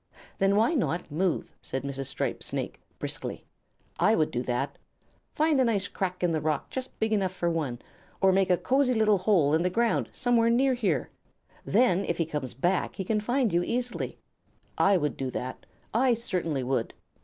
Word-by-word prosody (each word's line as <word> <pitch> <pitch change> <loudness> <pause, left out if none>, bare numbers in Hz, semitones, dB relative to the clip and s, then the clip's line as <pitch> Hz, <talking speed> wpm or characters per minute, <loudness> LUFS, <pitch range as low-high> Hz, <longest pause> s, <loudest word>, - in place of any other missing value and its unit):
"Then 195 +1 +3
why 225 +10 +3
not 180 - -1
move?" 175 +4 0
said 130 - -4
Mrs. 135 -1 -3
Striped - - -2
Snake, - - -4 0.2
briskly. - - -4 0.5
"I 215 - +4
would 155 - +1
do 120 - -1
that. 130 +3 -2 0.6
Find 305 -3 +3
a - - +5
nice 205 -5 +1
crack 185 -1 -3
in 175 - +3
the 160 -1 0
rock 150 -2 -1
just 260 -1 -6
big 220 0 +1
enough 195 -3 +1
for 175 -2 -1
one, 150 -7 -2 0.4
or 190 -1 +5
make 190 0 +2
a 180 - +4
cosy 260 +2 +2
little 215 -3 +3
hole 180 -7 +3
in 160 - +3
the 180 - +2
ground 230 +4 +1
somewhere 240 -2 +2
near 260 +3 +3
here. 195 - -1 0.5
Then 200 -3 +3
if 170 - -1
he 165 - +1
comes 150 -5 -4
back 175 +8 0
he 190 - -3
can 215 +3 0
find 240 0 0
you 175 - +3
easily. 245 +6 -2 0.6
I 195 -1 +4
would 150 -4 -1
do 135 -1 -2
that. 130 0 -6 0.3
I 245 +2 +3
certainly 175 - -2
would." 125 -2 -1
190 Hz, 190 wpm, -28 LUFS, 155-230 Hz, 0.6 s, a